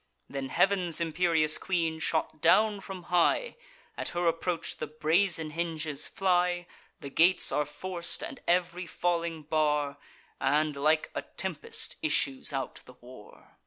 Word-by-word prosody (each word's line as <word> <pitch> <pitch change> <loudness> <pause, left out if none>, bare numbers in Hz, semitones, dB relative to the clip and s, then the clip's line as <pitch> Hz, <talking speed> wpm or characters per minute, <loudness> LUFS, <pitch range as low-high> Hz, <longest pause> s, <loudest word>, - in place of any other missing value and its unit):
Then 135 -1 -5
heav'n's 180 0 +2
imperious 165 -2 +2
queen 165 -4 -1
shot 155 -1 -1
down 205 +5 +4
from 190 -2 -8
high: 325 - +3 0.4
At - - -3
her 175 - +1
approach 165 0 -1
the - - -4
brazen 160 +2 +1
hinges 160 -3 -2
fly; 180 -2 +1 0.4
The 140 - -7
gates 175 +5 +4
are 150 - +1
forc'd, 170 - -4
and 310 -4 -6
ev'ry 180 0 +1
falling 170 -1 -1
bar; 150 -2 +1 0.4
And, 150 +2 +2
like 155 +3 +2
a - - -2
tempest, 180 -4 -4
issues 140 -3 +1
out 135 -1 -4
the 125 - -13
war. 120 -4 -15
165 Hz, 135 wpm, -29 LUFS, 150-180 Hz, 0.4 s, down